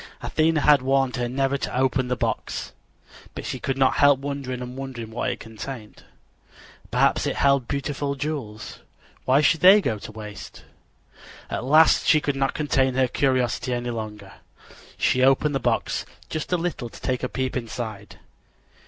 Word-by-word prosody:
Athena 160 Hz, -1 st, +1 dB
had 145 Hz, -2 st, +5 dB
warned 135 Hz, -1 st, +1 dB
her 120 Hz, -1 st, -1 dB
never 135 Hz, +2 st, 0 dB
to -, -, -3 dB
open 130 Hz, 0 st, +1 dB
the 125 Hz, -, 0 dB
box, -, -, -3 dB, 0.6 s
but -, -, -6 dB
she -, -, -4 dB
could 135 Hz, -1 st, -2 dB
not 135 Hz, -1 st, +3 dB
help 145 Hz, -2 st, +5 dB
wondering 140 Hz, -2 st, -4 dB
and 125 Hz, 0 st, -7 dB
wondering 130 Hz, -4 st, -7 dB
what 120 Hz, +3 st, -2 dB
it 120 Hz, -, -4 dB
contained. 110 Hz, 0 st, -9 dB, 0.9 s
Perhaps -, -, +2 dB
it -, -, -1 dB
held 140 Hz, -3 st, +2 dB
beautiful 140 Hz, 0 st, -2 dB
jewels. 130 Hz, -9 st, -5 dB, 0.5 s
Why 135 Hz, +3 st, +4 dB
should 155 Hz, +2 st, +3 dB
they 190 Hz, +5 st, +8 dB
go 110 Hz, -, -2 dB
to 105 Hz, -, -9 dB
waste? 105 Hz, -1 st, -10 dB, 0.9 s
At -, -, -3 dB
last 155 Hz, +4 st, +5 dB
she 155 Hz, -, +6 dB
could 145 Hz, -2 st, -2 dB
not 135 Hz, 0 st, 0 dB
contain 135 Hz, -4 st, +1 dB
her 130 Hz, -1 st, +3 dB
curiosity 130 Hz, -1 st, 0 dB
any 120 Hz, 0 st, -3 dB
longer. 105 Hz, -3 st, -7 dB, 0.6 s
She 130 Hz, -, +2 dB
opened 135 Hz, +3 st, +3 dB
the 135 Hz, -, 0 dB
box -, -, -1 dB, 0.3 s
just 155 Hz, +2 st, -4 dB
a 180 Hz, -, +3 dB
little 165 Hz, -8 st, -3 dB
to -, -, -13 dB
take 125 Hz, -1 st, -2 dB
a 125 Hz, -, -2 dB
peep 130 Hz, -1 st, -3 dB
inside. 110 Hz, -4 st, -6 dB
130 Hz, 170 wpm, -24 LUFS, 120-140 Hz, 0.9 s, they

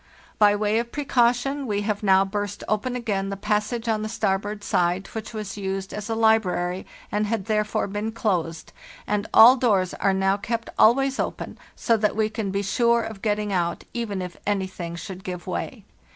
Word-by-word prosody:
" -, -, -24 dB
By 205 Hz, -1 st, +6 dB
way 210 Hz, +1 st, +1 dB
of 235 Hz, 0 st, -4 dB
precaution 270 Hz, 0 st, +1 dB
we 205 Hz, -2 st, 0 dB
have 205 Hz, 0 st, -2 dB
now 195 Hz, -1 st, +4 dB
burst 205 Hz, 0 st, -4 dB
open 215 Hz, +4 st, -1 dB
again 205 Hz, -5 st, -2 dB
the 195 Hz, -, -4 dB
passage 210 Hz, +4 st, -1 dB
on 220 Hz, -2 st, +1 dB
the 215 Hz, -, -3 dB
starboard 205 Hz, -1 st, -1 dB
side 180 Hz, +1 st, +1 dB
which 220 Hz, -1 st, -5 dB
was 215 Hz, -3 st, -6 dB
used 195 Hz, -1 st, -4 dB
as 210 Hz, +1 st, -5 dB
a 225 Hz, -, 0 dB
library 190 Hz, -5 st, +1 dB, 0.2 s
and 210 Hz, 0 st, 0 dB
had 215 Hz, -3 st, -2 dB
therefore 215 Hz, 0 st, 0 dB
been 205 Hz, +2 st, -3 dB
closed, 170 Hz, -8 st, -2 dB, 0.3 s
and 210 Hz, 0 st, -1 dB
all 245 Hz, +4 st, +9 dB
doors 200 Hz, -8 st, +2 dB
are 195 Hz, -, +1 dB
now 195 Hz, +1 st, +2 dB
kept 230 Hz, +3 st, -4 dB
always 270 Hz, +4 st, +4 dB
open, -, -, -3 dB, 0.2 s
so 230 Hz, -, +2 dB
that 210 Hz, -1 st, +1 dB
we 215 Hz, 0 st, +1 dB
can 215 Hz, -3 st, -3 dB
be 200 Hz, +1 st, -1 dB
sure 235 Hz, +3 st, +2 dB
of 215 Hz, -3 st, -7 dB
getting 210 Hz, -1 st, -1 dB
out, 170 Hz, -2 st, -1 dB
even 210 Hz, -6 st, -3 dB
if 180 Hz, -1 st, -8 dB
anything 190 Hz, -4 st, -2 dB
should 190 Hz, +2 st, -8 dB
give 180 Hz, -2 st, -6 dB
way. -, -, -4 dB
210 Hz, 190 wpm, -24 LUFS, 195-225 Hz, 0.3 s, all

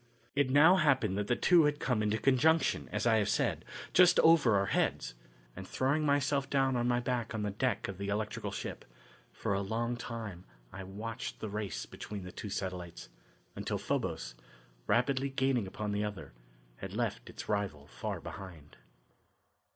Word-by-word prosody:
It 140 Hz, -2 st, +2 dB
now 155 Hz, +7 st, +7 dB
happened 135 Hz, -, +2 dB
that 105 Hz, -, -2 dB
the 120 Hz, -, +2 dB
two 170 Hz, +2 st, +5 dB
had 150 Hz, 0 st, +1 dB
come 120 Hz, -5 st, 0 dB
into 105 Hz, 0 st, +1 dB
conjunction, 150 Hz, +6 st, +3 dB
as -, -, -1 dB
I 115 Hz, -2 st, +5 dB
have 105 Hz, -2 st, +1 dB
said, -, -, 0 dB, 0.3 s
just 180 Hz, -1 st, +6 dB
over 160 Hz, -9 st, +6 dB
our 100 Hz, 0 st, +3 dB
heads, -, -, 0 dB, 0.4 s
and, -, -, -8 dB
throwing 140 Hz, +4 st, +1 dB
myself 140 Hz, -1 st, +1 dB
down 135 Hz, -2 st, +2 dB
on 120 Hz, 0 st, +1 dB
my 120 Hz, 0 st, +2 dB
back 120 Hz, -2 st, -2 dB
on 105 Hz, -, -2 dB
the 105 Hz, -, -1 dB
deck 125 Hz, +5 st, -1 dB
of 95 Hz, -1 st, -7 dB
the 100 Hz, -, -3 dB
electrical 105 Hz, +1 st, -2 dB
ship, -, -, -6 dB, 0.5 s
for -, -, -2 dB
a 100 Hz, -, 0 dB
long 115 Hz, +4 st, -1 dB
time 115 Hz, -7 st, -6 dB, 0.3 s
I 95 Hz, +1 st, -6 dB
watched 110 Hz, +5 st, -6 dB
the 110 Hz, -, -4 dB
race 105 Hz, -1 st, -4 dB
between 105 Hz, -2 st, -7 dB
the 90 Hz, -, -8 dB
two 105 Hz, -, -7 dB
satellites, 90 Hz, -8 st, -5 dB, 0.5 s
until -, -, -2 dB
Phobos, -, -, -2 dB, 0.5 s
rapidly 135 Hz, +3 st, +2 dB
gaining 130 Hz, -5 st, +1 dB
upon 105 Hz, +2 st, -4 dB
the 105 Hz, +1 st, 0 dB
other, 105 Hz, -10 st, -6 dB, 0.4 s
had -, -, -7 dB
left -, -, -2 dB
its -, -, -8 dB
rival 100 Hz, -9 st, -2 dB
far -, -, -5 dB
behind. 85 Hz, -6 st, -10 dB
110 Hz, 175 wpm, -32 LUFS, 100-135 Hz, 0.5 s, now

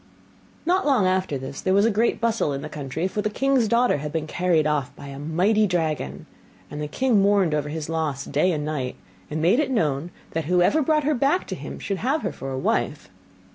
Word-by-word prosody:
Not 360 Hz, +3 st, +2 dB
long 265 Hz, -9 st, +3 dB
after 185 Hz, -5 st, +1 dB
this 135 Hz, +1 st, -7 dB
there 185 Hz, 0 st, +2 dB
was 200 Hz, +2 st, +5 dB
a 230 Hz, -, +3 dB
great 220 Hz, +3 st, +1 dB
bustle 225 Hz, -10 st, +1 dB
in 140 Hz, +1 st, -4 dB
the 155 Hz, -, -6 dB
country; 150 Hz, +4 st, -3 dB
for 210 Hz, +2 st, -2 dB
the 215 Hz, -, -1 dB
king's 265 Hz, +1 st, +2 dB
daughter 235 Hz, -2 st, +3 dB
had 150 Hz, +1 st, -5 dB
been 160 Hz, 0 st, -2 dB
carried 170 Hz, -1 st, +1 dB
off 150 Hz, -4 st, 0 dB
by 140 Hz, -, -10 dB
a 135 Hz, 0 st, -8 dB
mighty 185 Hz, +8 st, +2 dB
dragon, 160 Hz, -, -2 dB, 0.5 s
and 150 Hz, -, -5 dB
the 150 Hz, -, -2 dB
king 235 Hz, -, +2 dB
mourned 195 Hz, -5 st, +3 dB
over 150 Hz, -1 st, -1 dB
his 155 Hz, 0 st, -4 dB
loss 155 Hz, -4 st, -2 dB
day 150 Hz, +6 st, +1 dB
and 150 Hz, -3 st, -2 dB
night, 140 Hz, -5 st, -3 dB, 0.3 s
and 155 Hz, +1 st, -3 dB
made 190 Hz, -, +4 dB
it 300 Hz, -, +1 dB
known 160 Hz, -, 0 dB, 0.2 s
that 160 Hz, -2 st, -2 dB
whoever 180 Hz, -, +3 dB
brought 305 Hz, +1 st, +2 dB
her 300 Hz, +2 st, +2 dB
back 280 Hz, +7 st, +1 dB
to -, -, -3 dB
him -, -, -7 dB
should 195 Hz, -, -3 dB
have 275 Hz, +6 st, 0 dB
her -, -, -1 dB
for 135 Hz, -, -7 dB
a 130 Hz, -, -3 dB
wife. 120 Hz, -4 st, -1 dB
170 Hz, 225 wpm, -24 LUFS, 150-220 Hz, 0.5 s, was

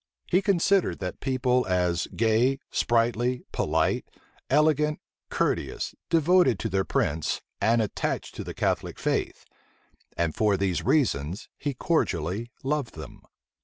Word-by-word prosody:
He 185 Hz, -, +2 dB
considered 195 Hz, 0 st, +2 dB
that 90 Hz, -2 st, -5 dB
people 130 Hz, -1 st, +1 dB
as 90 Hz, -2 st, +1 dB
gay, 115 Hz, +4 st, +3 dB
sprightly, 120 Hz, +2 st, +1 dB
polite, -, -, +1 dB, 0.5 s
elegant, 150 Hz, +1 st, +3 dB, 0.3 s
courteous, -, -, -1 dB, 0.2 s
devoted 165 Hz, -, +4 dB
to 110 Hz, -, -3 dB
their 95 Hz, 0 st, +1 dB
prince, 80 Hz, -3 st, -1 dB, 0.2 s
and 115 Hz, 0 st, +3 dB
attached 105 Hz, -, -3 dB
to -, -, -6 dB
the -, -, -7 dB
Catholic -, -, -1 dB
faith; -, -, -2 dB, 0.7 s
and 85 Hz, -2 st, 0 dB
for 105 Hz, -2 st, +2 dB
these 95 Hz, -2 st, 0 dB
reasons 115 Hz, -, 0 dB
he 145 Hz, -2 st, -2 dB
cordially 110 Hz, -, -1 dB
loved 140 Hz, -3 st, -1 dB
them. 80 Hz, -4 st, -10 dB
120 Hz, 125 wpm, -26 LUFS, 95-150 Hz, 0.7 s, devoted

